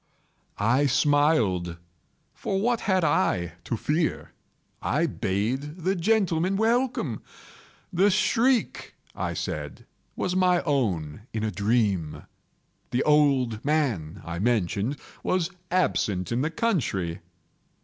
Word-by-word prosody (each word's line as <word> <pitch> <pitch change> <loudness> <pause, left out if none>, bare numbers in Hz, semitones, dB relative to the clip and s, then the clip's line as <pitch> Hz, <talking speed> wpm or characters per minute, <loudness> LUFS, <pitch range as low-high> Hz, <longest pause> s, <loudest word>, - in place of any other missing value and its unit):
I 125 +7 +3
smiled,—for 105 - 0
what 235 +3 +1
had 185 -3 +1
I 90 - +1
to 115 - -2
fear? 155 +7 -1 0.5
I - - +1
bade 125 +10 -2
the 190 +2 +2
gentlemen 190 -1 +1
welcome. 235 +4 0 0.7
The 190 +4 +4
shriek, 225 +5 +1 0.2
I - - -3
said, - - -5 0.3
was 180 0 -1
my 180 -1 +3
own 105 - -1
in 110 -1 -2
a 110 - 0
dream. 100 -7 0 0.7
The 125 - 0
old 135 -7 +3
man, 115 - -1
I 85 0 -4
mentioned, 110 +3 0 0.2
was 185 -1 0 0.2
absent 110 - 0
in 120 +2 +1
the 150 - 0
country. 115 - -1
140 Hz, 110 wpm, -26 LUFS, -, 0.7 s, The